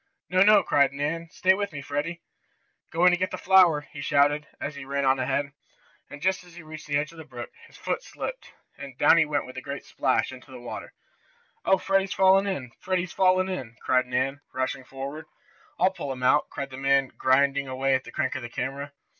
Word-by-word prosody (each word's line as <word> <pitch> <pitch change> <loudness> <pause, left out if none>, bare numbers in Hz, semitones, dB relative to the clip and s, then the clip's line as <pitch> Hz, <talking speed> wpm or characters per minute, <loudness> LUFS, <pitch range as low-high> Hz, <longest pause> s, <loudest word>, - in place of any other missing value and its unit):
"No, 185 0 +4
no!" 205 0 +7
cried 140 -3 +3
Nan. 155 +4 -3
"Stay 185 +1 +3
with 200 +1 -2
me, 145 - -6
Freddie." 145 +5 -4 0.7
"Going 175 +2 +5
to 180 - +2
get 185 +2 -1
the - - -5
flower!" 180 -6 +5
he 140 - -8
shouted, 145 +2 +2
as 145 - -4
he 140 -1 -8
ran 140 +1 -2
on 130 0 +3
ahead. 140 +2 -1 0.6
And, 145 +1 -10
just 190 0 +1
as 175 -2 -17
he 175 - -10
reached 155 0 -10
the 145 -1 +1
edge 150 +2 -2
of 165 - -14
the - - -7
brook, 120 -4 -9 0.2
his - - -17
foot - - -2
slipped, - - -7 0.3
and 140 -3 -9
down 150 +4 +6
he 160 - +5
went 150 -1 -1
with 130 0 -11
a - - -4
great 140 +2 -6
splash, 130 -1 0
into 130 +1 -12
the 130 -1 -10
water. 120 - -8 0.7
"Oh, 190 - +5
Freddie's 195 0 0
fallen 195 +1 +5
in! 135 -11 -3
Freddie's 185 -1 -2
fallen 185 0 +3
in!" 130 -12 -5
cried 130 0 +2
Nan, 130 +3 -1
rushing 130 +1 -2
forward. 140 +4 -7 0.5
"I'll 190 - +3
pull 155 -7 -5
him 125 -1 -6
out!" 145 +4 +3
cried 140 -1 -6
the 130 - -8
man 135 0 +2
grinding 140 +1 +2
away 135 +1 0
at 130 0 +1
the - - -11
crank 140 -4 -1
of 130 - -4
the 120 - -7
camera. 140 +4 -4
145 Hz, 220 wpm, -26 LUFS, 135-180 Hz, 0.7 s, no